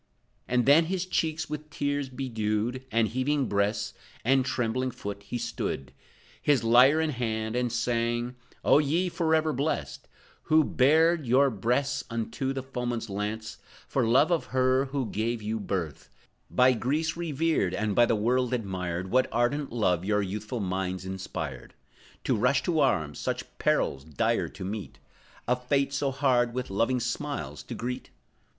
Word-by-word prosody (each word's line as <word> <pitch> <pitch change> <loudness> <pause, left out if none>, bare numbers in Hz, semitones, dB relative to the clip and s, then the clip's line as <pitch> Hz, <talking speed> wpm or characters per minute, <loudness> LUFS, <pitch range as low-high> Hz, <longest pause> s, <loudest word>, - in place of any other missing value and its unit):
And 125 -1 +2
then, 150 +4 +6
his 185 +1 -2
cheeks 160 -3 -1
with 150 0 -6
tears 145 -2 -2
bedewed, 120 -1 -2
And 110 -1 +2
heaving 135 +4 0
breast, 100 0 0 0.3
and 135 +1 +4
trembling 130 0 -1
foot, 100 -5 -6
he 100 +4 -5
stood, 70 - -3 0.5
His 145 -5 +3
lyre 125 +6 +6
in 160 -1 +1
hand 110 -3 -2
and 125 -1 0
sang: 120 +1 -1 0.3
"O - - +6
ye, 165 +5 +1
forever 160 -2 +1
blessed, 140 +5 -2 0.4
Who 155 0 +5
bared 155 +3 +3
your 135 +3 +4
breasts 125 +6 0
unto 115 +3 -2
the 135 -1 -4
foeman's 120 -4 -3
lance, 105 +2 -4 0.3
For 135 - 0
love 130 +9 +4
of 170 - +1
her, 130 +1 +2
who 135 -1 -2
gave 110 +1 -2
you 110 +1 -2
birth; 90 -8 -4 0.4
By 125 +1 +5
Greece 150 +7 -1
revered, 160 - 0
and 105 0 -1
by 120 +3 +5
the 115 - +2
world 125 +3 +1
admired, 95 -4 -3
What 130 +1 +3
ardent 130 +5 0
love 90 -7 +1
your 105 +1 +1
youthful 105 +4 -4
minds 95 -1 -2
inspired, 95 0 -6 0.5
To - - +1
rush 125 +5 +2
to 165 -3 +1
arms, 80 - +1
such - - -4
perils 70 -1 +1
dire 75 -2 0
to 95 - -8
meet, 100 +1 -5 0.5
A 125 - +3
fate 135 +2 0
so 140 0 0
hard, 125 -3 +1
with 125 -5 -3
loving 115 +6 +1
smiles 140 +4 -3
to 120 - -7
greet? 125 +3 -4
125 Hz, 155 wpm, -28 LUFS, 110-140 Hz, 0.5 s, then